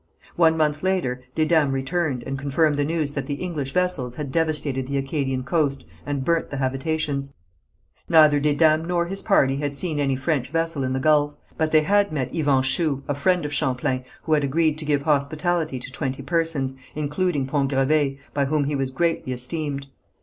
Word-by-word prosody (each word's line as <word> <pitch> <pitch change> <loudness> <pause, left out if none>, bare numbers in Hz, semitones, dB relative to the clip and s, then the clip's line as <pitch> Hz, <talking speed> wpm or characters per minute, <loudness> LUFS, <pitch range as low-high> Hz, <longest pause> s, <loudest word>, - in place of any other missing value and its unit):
One 160 -1 +4
month 150 -1 +1
later 180 -10 0
Desdames 155 -3 +3
returned, 135 -1 -1
and 135 - -4
confirmed 145 +2 +2
the 145 0 0
news 155 -1 -1
that 140 -2 -4
the 145 - -2
English 150 -5 -4
vessels 180 -9 0
had 145 -2 -5
devastated 150 -4 0
the 140 0 -1
Acadian 135 -2 -1
coast, 140 -2 0 0.2
and 140 -2 -2
burnt 170 -1 +1
the 145 - -5
habitations. 140 +1 -2 0.7
Neither 155 -3 +6
Desdames 155 +2 +3
nor 175 -1 +1
his 195 +3 -5
party 135 -10 +3
had 145 0 -3
seen 155 0 -1
any 135 -2 +1
French 135 -1 -1
vessel 165 -2 -1
in 130 0 -1
the 130 - 0
gulf, 145 0 +3 0.2
but 160 -1 0
they 155 - +5
had 200 +5 +2
met 130 -5 -3
Iuan 140 -4 +2
Chou, 140 0 0
a 145 - 0
friend 175 +4 +1
of 145 - -3
Champlain, 130 0 0 0.2
who 160 - 0
had 150 -1 +3
agreed 155 +2 +1
to 155 - -6
give 145 -2 +1
hospitality 155 +1 0
to 125 +1 -8
twenty 135 0 -3
persons, 155 -4 0 0.2
including 150 0 -1
Pont 135 0 0
Gravé, 135 +1 +1 0.2
by 140 -1 +1
whom 150 +1 +1
he 145 +1 -1
was 135 -1 -1
greatly 150 -1 -1
esteemed. 140 +2 -3
145 Hz, 185 wpm, -23 LUFS, 135-160 Hz, 0.7 s, Neither